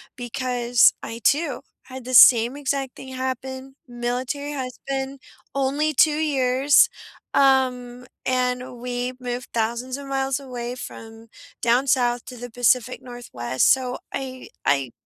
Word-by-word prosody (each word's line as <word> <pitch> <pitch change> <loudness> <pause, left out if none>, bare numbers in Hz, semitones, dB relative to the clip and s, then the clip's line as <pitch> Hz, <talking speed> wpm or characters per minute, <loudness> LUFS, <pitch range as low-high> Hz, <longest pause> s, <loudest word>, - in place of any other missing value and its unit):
because 245 -1 +2
I 230 +1 -6
too 290 -3 +1 0.2
had 260 -1 -10
the 255 - -5
same 235 +2 +8
exact 275 -2 -2
thing 265 - -10
happen, 260 +1 -5
Military 250 +4 -3
husband, 270 +1 -5 0.3
only 280 +3 0
2 305 +3 +5
years, 275 -2 +3 0.4
um, 250 -2 +2 0.2
and 250 -1 -1
we 250 0 -3
moved 245 0 -5
thousands 235 +3 -2
of 280 -1 -9
miles 270 0 -1
away 250 -2 -6
from 225 -2 -10 0.3
down 240 +3 +3
south 245 -2 +1
to 250 -1 -9
the 245 +1 -7
Pacific 245 +1 +1
Northwest. 130 - -1
So 255 -1 +1 0.2
I 260 -1 -6 0.2
I 135 -4 +1
255 Hz, 130 wpm, -23 LUFS, 245-270 Hz, 0.4 s, same